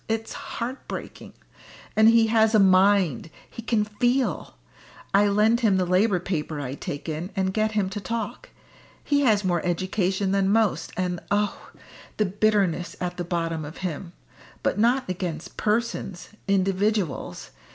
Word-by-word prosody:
It's 225 0 -2
heart 245 +3 -6
breaking. - - -8 0.6
And 220 +1 +6
he 230 0 +5
has 220 0 +3
a - - +6
mind; 190 - +4 0.2
he - - -9
can 225 -2 +1
feel! 245 +5 -1 0.6
I 205 +1 +5
lend 210 +3 +3
him 215 -6 +3
the 185 - +1
Labour 185 +2 +2
paper 160 -4 -3
I 135 -2 -4
take 145 +1 -6
in, 160 +3 -4
and 190 -1 0
get 215 +1 0
him 205 -3 +1
to 205 +1 -4
talk. 230 - -4 0.5
He 285 -1 +2
has 215 -6 +3
more 175 -3 0
education 185 +2 0
than 195 -1 +2
most, 205 -6 +1
and 180 -1 -1
oh! 205 +1 -1 0.5
the 215 - +2
bitterness 195 -3 +1
at 180 0 -3
the 175 - -2
bottom 165 -2 -2
of 150 +2 -9
him. 170 +1 -5 0.5
But - - 0
not 245 +4 +2
against 175 -3 -4
persons 210 -4 -2 0.2
individuals. 195 -3 0
195 Hz, 150 wpm, -25 LUFS, 180-220 Hz, 0.6 s, And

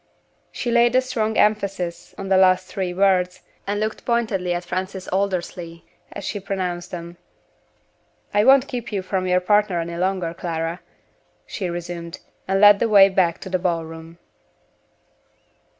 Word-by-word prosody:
She 240 - -3
laid 240 +1 +4
a 255 - +5
strong 220 -4 -2
emphasis 195 -5 0
on 195 - -6
the 190 - +4
last 185 0 +4
three 190 -2 -3
words, 185 -1 +1 0.2
and 205 +1 -1
looked 215 0 -3
pointedly 215 -7 0
at 175 0 -2
Francis 185 +1 -4
Aldersley 175 -3 -3 0.3
as 200 - -7
she 205 - -3
pronounced 180 -2 -4
them. 170 0 -8 1.2
"I 205 0 +4
won't 270 +2 +6
keep 245 -2 -5
you 195 -2 -2
from 185 0 -2
your 180 0 +2
partner 205 -1 +2
any 170 0 -4
longer, 185 -2 -1
Clara," 165 0 -4 0.7
she 185 -4 -4
resumed, 170 0 -6 0.3
and 195 +1 +1
led 205 0 +7
the 230 - +1
way 200 -2 +7
back 180 -3 +1
to - - -7
the 185 - +1
ball 170 -2 -1
room. 165 +1 -11
185 Hz, 155 wpm, -22 LUFS, 175-205 Hz, 1.2 s, led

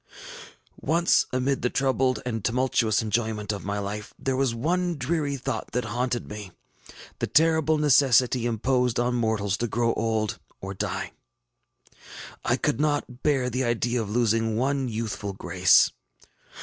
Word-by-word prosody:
ŌĆÖ - - -10 0.2
ŌĆ£Once, - - +4
amid 130 +1 0
the 125 - +1
troubled 130 -1 0
and 115 -4 -3
tumultuous 115 -3 +1
enjoyment 110 -1 -1
of 100 - -5
my 100 +1 -3
life, 105 +1 -5
there 135 -1 -1
was 135 -1 +1
a 175 +8 0
dreamy 140 +1 -1
thought 130 - -4
that 125 0 -1
haunted 120 +2 -2
me, 105 -2 -7 0.7
the - - -1
terrible 160 0 +3
necessity 130 -4 +4
imposed 125 +1 +1
on 120 +1 +1
mortals 110 -4 0
to 120 - -1
grow 115 +1 +1
old, 110 -2 -1 0.2
or 95 0 -6
die. 95 - -3 1.3
I - - +1
could - - -1
not 145 -4 -1
bear 135 -4 +1
the 130 +2 -1
idea 120 0 0
of 105 - -5
losing 115 -1 +1
one 135 +1 0
youthful 110 -3 -4
grace. 90 -2 +4
120 Hz, 150 wpm, -26 LUFS, 110-130 Hz, 1.3 s, ŌĆ£Once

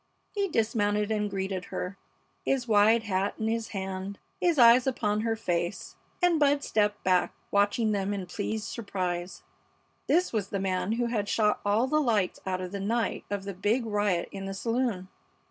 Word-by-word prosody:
He 400 -1 0
dismounted 210 - +1
and 210 -1 0
greeted 190 -1 -3
her, 180 +2 -5 0.5
his 260 -3 0
wide 220 +1 +5
hat 195 -1 -1
in 220 - -2
his 225 0 -1
hand, 190 0 -5 0.2
his 345 -3 +2
eyes 240 +1 +7
upon 210 -5 0
her 225 0 0
face, 175 -6 -2 0.3
and 345 -3 +4
Bud 285 -1 +3
stepped 210 -1 0
back, 185 -1 +2 0.2
watching 205 +2 +2
them 200 -1 -1
in 200 -2 -3
pleased 210 +3 -3
surprise. 185 -5 -4 0.6
This 360 -3 +2
was 205 -3 -1
the 200 - -2
man 190 +2 0
who 240 +1 0
had 220 -4 -1
shot 210 -2 +2
all 205 +4 +2
the 305 +3 +2
lights 215 -9 +1
out 185 -1 -1
the 200 - -4
night 225 +3 -1
of 200 -1 -3
the 200 0 -5
big 210 +6 0
riot 205 -5 0
in 195 0 -6
the 195 0 -4
saloon. 230 -3 -1
210 Hz, 175 wpm, -28 LUFS, 195-230 Hz, 0.6 s, eyes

